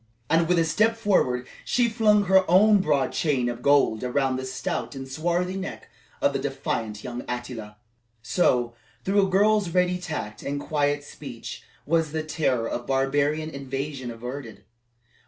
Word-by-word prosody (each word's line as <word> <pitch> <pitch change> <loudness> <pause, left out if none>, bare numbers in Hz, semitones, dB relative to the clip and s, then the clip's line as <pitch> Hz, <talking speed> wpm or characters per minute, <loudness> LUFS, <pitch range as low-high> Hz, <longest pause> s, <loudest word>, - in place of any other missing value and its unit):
And, 165 0 +4
with 180 0 +3
a 165 - +3
step 215 +8 +2
forward, 130 - +1 0.2
she 245 -1 +2
flung 215 -2 +3
her 190 0 +5
own 205 +4 +6
broad 140 -6 +1
chain 135 -6 0
of 120 0 -4
gold 140 -5 +3
around 130 +1 +1
the 130 0 -4
stout 150 +4 -3
and 135 0 -6
swarthy 175 +6 -1
neck 195 0 -6 0.3
of - - +3
the - - -1
defiant 105 -2 -3
young 125 0 -5
Attila. 120 -4 -5 0.5
So, 120 -2 +2 0.3
through 195 0 +3
a - - -5
girl's 205 0 +3
ready 180 +1 +1
tact 150 -12 -5
and 145 +1 -3
quiet 145 -1 0
speech, 135 -5 -8 0.2
was 160 -1 +1
the 160 -1 -1
terror 135 -7 0
of 120 - -4
barbarian 145 +3 +1
invasion 135 -1 -5
averted. 120 +1 -7
145 Hz, 155 wpm, -25 LUFS, 125-180 Hz, 0.5 s, own